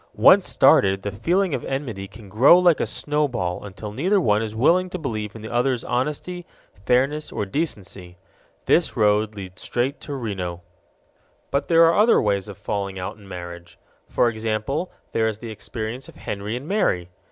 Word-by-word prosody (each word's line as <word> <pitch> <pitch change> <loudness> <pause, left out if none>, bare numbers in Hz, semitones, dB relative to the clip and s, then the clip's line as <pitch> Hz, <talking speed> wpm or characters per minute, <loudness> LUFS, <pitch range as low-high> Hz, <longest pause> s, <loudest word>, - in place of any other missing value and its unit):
Once - - +6
started, 95 0 +4
the 100 - -3
feeling 170 - 0
of - - -2
enmity 120 -8 -4
can 105 +1 -13
grow 120 - +6
like 175 -3 +4
a - - 0
snowball 130 -12 -1
until 105 +1 -8
neither 185 - +1
one 105 - +2
is 110 -1 -4
willing 175 +10 +3
to 185 - -4
believe 110 - -4
in 110 - -9
the 110 - -7
other's 125 0 +1
honesty, 150 +7 -2 0.4
fairness, 140 +5 +1
or - - -2
decency. 95 - -4 0.5
This - - +2
road 105 0 +2
leads 95 -2 -9
straight 130 +4 -2
to 145 - -6
Reno. 95 -8 -4 0.9
But 140 +1 0
there 165 -1 +6
are 165 - +5
many 205 - +4
other 230 +2 +5
ways 100 -1 0
of 100 - -9
falling 100 -2 -3
out 90 0 -5
in 100 -2 -16
marriage. 85 -1 -9 0.3
For - - +2
example, 115 +8 -2 0.2
there 110 0 +1
is 110 -2 -2
the 115 0 -8
experience 110 +4 -6
of - - -15
Henry 105 +2 -5
and 130 +4 -6
Mary. 90 - 0
110 Hz, 180 wpm, -23 LUFS, 100-145 Hz, 0.9 s, Once